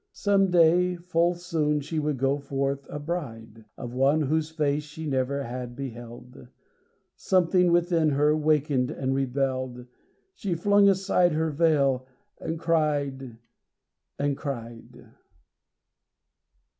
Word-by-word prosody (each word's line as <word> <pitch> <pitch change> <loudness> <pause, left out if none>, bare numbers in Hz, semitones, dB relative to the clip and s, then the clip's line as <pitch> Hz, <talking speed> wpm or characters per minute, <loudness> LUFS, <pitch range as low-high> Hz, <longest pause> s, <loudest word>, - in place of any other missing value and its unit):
Some 195 -2 +2
day, 175 +1 +4
full 175 0 0
soon, 160 -4 -1
she 155 +3 -3
would 150 -2 -1
go 135 +2 +1
forth 140 0 -3
a - - -5
bride— 115 -9 -6
Of 120 -2 -7
one 135 +4 +2
whose 155 +2 0
face 150 -2 0
she 150 +2 -9
never 140 0 -1
had 125 0 -6
beheld. 120 -1 -9 0.7
Something 180 -1 +2
within 170 -2 +2
her, 150 +1 +2
wakened, 150 -4 +1
and 135 0 -2
rebelled; 130 -2 -2 0.5
She 195 - -3
flung 200 +3 +4
aside 190 -3 +2
her 160 +1 0
veil, 140 -5 +2 0.3
and 160 0 -4
cried, 145 -7 -1 0.8
and 145 0 0
cried. 120 -6 -8
150 Hz, 120 wpm, -26 LUFS, 135-165 Hz, 0.8 s, day